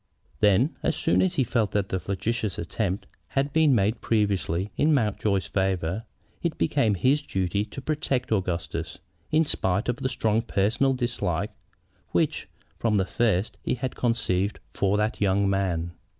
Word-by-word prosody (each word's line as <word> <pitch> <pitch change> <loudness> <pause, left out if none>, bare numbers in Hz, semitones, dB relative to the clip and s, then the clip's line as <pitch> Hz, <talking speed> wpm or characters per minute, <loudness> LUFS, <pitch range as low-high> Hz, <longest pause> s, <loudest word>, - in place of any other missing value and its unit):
Then, 105 - +4
as - - 0
soon 90 +2 +2
as 95 -1 +1
he 135 - +3
felt 110 -3 +1
that 100 -2 0
the 95 - -1
flagitious 100 +2 -2
attempt 95 +3 -2 0.2
had 140 +1 -1
been 155 -4 +5
made 105 +2 +1
previously, 100 -3 0
in 155 0 +3
Mountjoy's 105 -6 +1
favor, 95 +1 -1 0.4
it 170 -2 -1
became 120 -9 +2
his 135 +10 +3
duty 95 - -1
to 110 +6 -8
protect 140 -5 -1
Augustus, 90 -5 -2 0.3
in 160 +1 +3
spite 95 -6 0
of 120 - 0
the 130 - -1
strong 110 -3 +1
personal 115 +5 +1
dislike 105 -7 -1 0.6
which - - 0 0.3
from 110 -3 +2
the 95 - +2
first 110 -3 0
he - - -1
had 130 +1 -4
conceived 110 -5 0
for 100 +1 +1
that 105 +1 -1
young 100 0 +3
man. 90 -4 0
105 Hz, 155 wpm, -26 LUFS, 95-120 Hz, 0.6 s, been